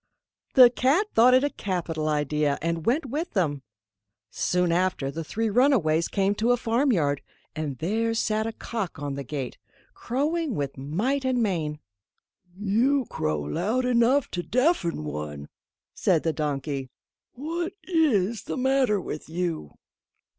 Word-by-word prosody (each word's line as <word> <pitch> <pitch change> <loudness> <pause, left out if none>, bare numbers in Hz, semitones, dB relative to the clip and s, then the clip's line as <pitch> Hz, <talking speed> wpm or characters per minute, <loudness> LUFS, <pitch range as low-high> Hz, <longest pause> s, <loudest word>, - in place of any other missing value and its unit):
The 250 -3 +9
cat 290 - +2
thought 245 +3 +6
it 260 - +4
a 290 - +2
capital 165 -5 -2
idea, 150 -1 0
and 165 0 -2
went 275 +6 +2
with 300 +7 -4
them. 150 -9 0 0.7
Soon 180 -1 +1
after 175 -6 0
the 165 +3 -5
three 225 +8 -2
runaways 200 - +3
came 195 0 +1
to 230 - +2
a 245 - +3
farmyard, 225 - +1 0.3
and 150 -4 -3
there 225 +7 0
sat 220 0 0
a - - -2
cock 220 -4 -5
on 145 -1 -4
the 140 0 -4
gate, 135 -1 -5 0.3
crowing 295 +2 -1
with 140 -3 -3
might 205 - -1
and 255 -2 +1
main. 160 -7 -1 0.8
"You 235 +7 +2
crow 75 -1 -1
loud 210 - -1
enough 250 +3 +3
to 175 - -2
deafen 250 - +1
one," 75 -1 -6 0.4
said 170 -5 +1
the 160 - 0
donkey; 140 -3 -3 0.4
"what 335 +7 -4
is 235 - +1
the - - -4
matter 260 -5 +2
with 155 -4 -6
you?" 165 - -3
195 Hz, 145 wpm, -26 LUFS, 150-255 Hz, 0.8 s, The